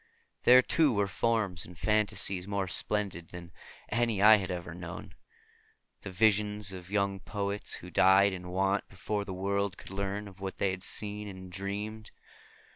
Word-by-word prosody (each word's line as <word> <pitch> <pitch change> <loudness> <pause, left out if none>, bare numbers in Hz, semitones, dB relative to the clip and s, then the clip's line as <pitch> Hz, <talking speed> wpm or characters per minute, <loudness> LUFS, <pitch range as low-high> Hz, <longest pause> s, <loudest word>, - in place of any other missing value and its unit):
There 125 +1 +8
too 155 0 +3
were 100 -1 +2
forms 100 -3 0
and 90 0 -13
fantasies 100 -1 0
more 100 -2 -1
splendid 95 -2 -2
than 85 -1 -10 0.4
any 115 -2 +1
I 105 +2 +8
had 95 -3 -4
ever 85 -2 -5
known; 85 -1 -8 0.9
the - - -7
visions 105 +1 +2
of 90 -1 -9
young 100 -1 0
poets 100 +1 -3
who 90 - -10
died 95 +3 +5
in 90 -1 -7
want 95 +2 0
before 100 +2 -3
the 100 - -6
world 100 +1 -1
could - - -12
learn 100 +1 -3
of 95 -1 -14
what 95 0 -5
they 95 - +1
had 95 0 -5
seen 105 +1 -1
and 95 -2 -9
dreamed. 105 +3 -5
100 Hz, 165 wpm, -30 LUFS, 95-105 Hz, 0.9 s, There